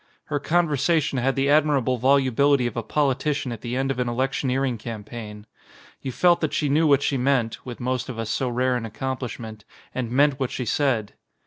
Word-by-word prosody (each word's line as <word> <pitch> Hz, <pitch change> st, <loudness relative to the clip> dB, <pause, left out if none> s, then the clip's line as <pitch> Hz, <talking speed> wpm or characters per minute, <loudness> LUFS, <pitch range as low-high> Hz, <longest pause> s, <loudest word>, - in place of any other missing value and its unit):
Her 145 Hz, -, +1 dB
conversation 155 Hz, -2 st, +1 dB
had 135 Hz, +2 st, +1 dB
the 135 Hz, 0 st, +1 dB
admirable 140 Hz, -4 st, +3 dB
volubility 135 Hz, +1 st, +3 dB
of 120 Hz, -, -3 dB
a 120 Hz, -, -1 dB
politician 140 Hz, +2 st, 0 dB
at 115 Hz, -, -6 dB
the 120 Hz, 0 st, -4 dB
end 135 Hz, +1 st, 0 dB
of 130 Hz, -, -4 dB
an 125 Hz, -1 st, 0 dB
electioneering 130 Hz, 0 st, -1 dB
cam 110 Hz, -2 st, -6 dB
paign. 105 Hz, -2 st, -8 dB, 0.6 s
You 130 Hz, -, -4 dB
felt 175 Hz, +6 st, +3 dB
that 155 Hz, -, -1 dB
she 150 Hz, -, 0 dB
knew 155 Hz, +3 st, +3 dB
what 140 Hz, -1 st, +4 dB
she 140 Hz, -, +1 dB
meant 125 Hz, -3 st, 0 dB
(with 120 Hz, -, -7 dB
most 125 Hz, +1 st, -2 dB
of 125 Hz, -, -6 dB
us 115 Hz, -1 st, -3 dB
so 130 Hz, +2 st, 0 dB
rare 125 Hz, +1 st, +1 dB
an 115 Hz, -2 st, -3 dB
accomplishment) 115 Hz, -3 st, -5 dB, 0.3 s
and 125 Hz, -3 st, -3 dB
meant 140 Hz, +2 st, +3 dB
what 130 Hz, -2 st, -1 dB
she 125 Hz, -, -4 dB
said. 120 Hz, -4 st, 0 dB
130 Hz, 200 wpm, -24 LUFS, 120-140 Hz, 0.6 s, what